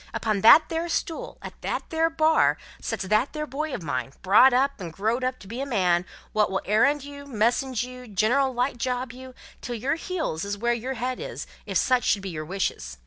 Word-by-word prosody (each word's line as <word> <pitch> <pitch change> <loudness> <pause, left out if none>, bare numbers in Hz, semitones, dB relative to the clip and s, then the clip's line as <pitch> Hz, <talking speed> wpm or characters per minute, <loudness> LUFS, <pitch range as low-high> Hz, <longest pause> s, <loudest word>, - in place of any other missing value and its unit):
Upon 215 -3 0
that 310 +9 +8
there 330 +1 -2
stool, 330 -1 -3
at - - -9
that - - -3
there 325 0 +2
Bar, 320 0 +3 0.2
sets - - -3
that 215 +7 +1
there 305 -1 -3
boy 300 +2 -4
of 200 - -5
mine, 135 -2 -3
brought 205 +8 +7
up 270 +2 +1
and 175 -3 -6
growed 220 +9 -1
up 255 0 -1
to 200 - -12
be 235 +6 -5
a - - -2
man, 180 -7 +1 0.3
wot 210 -2 +3
will 190 0 -2
errand 275 +8 +3
you, 285 0 -10
message 245 +1 0
you, 250 0 -9
general 235 +7 +2
light 250 0 -1
job 250 0 -2
you, 255 0 -11 0.3
till 240 - -4
your 255 +5 -1
heels 325 - -3
is 200 0 -3
where 235 +3 +1
your 250 +3 -3
head 250 +2 -3
is, - - -6 0.2
if - - 0
such 255 -2 +2
should 200 - +1
be 190 - -4
your 155 -2 -5
wishes. 65 - -3
245 Hz, 215 wpm, -25 LUFS, 205-275 Hz, 0.3 s, that